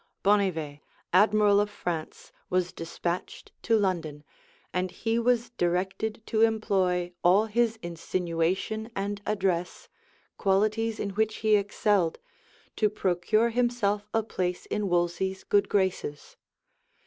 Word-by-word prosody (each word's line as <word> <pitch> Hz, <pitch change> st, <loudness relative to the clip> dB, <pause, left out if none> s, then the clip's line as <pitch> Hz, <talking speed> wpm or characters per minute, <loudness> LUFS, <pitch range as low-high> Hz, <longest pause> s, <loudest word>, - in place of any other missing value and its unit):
{1518.} 180 Hz, -8 st, +1 dB
Bonnivet, -, -, -41 dB, 0.3 s
admiral 205 Hz, +1 st, +5 dB
of 205 Hz, 0 st, +1 dB
France, 175 Hz, -6 st, -5 dB, 0.2 s
was 180 Hz, -1 st, 0 dB
despatched 170 Hz, +1 st, -5 dB
to 225 Hz, -1 st, +3 dB
London, 170 Hz, -7 st, -1 dB, 0.5 s
and 180 Hz, +1 st, 0 dB
he 225 Hz, +5 st, -1 dB
was 240 Hz, 0 st, +1 dB
directed 190 Hz, +3 st, -1 dB
to 220 Hz, -, 0 dB
employ 190 Hz, -5 st, +1 dB
all 190 Hz, +5 st, +5 dB
his 225 Hz, +1 st, +1 dB
insinuation 175 Hz, +5 st, -2 dB
and 200 Hz, +1 st, -3 dB
address, 185 Hz, -4 st, -1 dB, 0.5 s
(qualities 215 Hz, +3 st, +1 dB
in 200 Hz, -, -2 dB
which 220 Hz, +2 st, 0 dB
he 215 Hz, -1 st, +6 dB
excelled,) 200 Hz, -3 st, +1 dB, 0.6 s
to 215 Hz, -, +2 dB
procure 210 Hz, +4 st, +1 dB
himself 225 Hz, -4 st, 0 dB
a 225 Hz, -, +1 dB
place 180 Hz, -4 st, -3 dB
in 210 Hz, -2 st, -2 dB
Wolsey's 175 Hz, +2 st, 0 dB
good 200 Hz, -1 st, +2 dB
graces. 190 Hz, -7 st, -1 dB
200 Hz, 120 wpm, -27 LUFS, 180-215 Hz, 0.6 s, he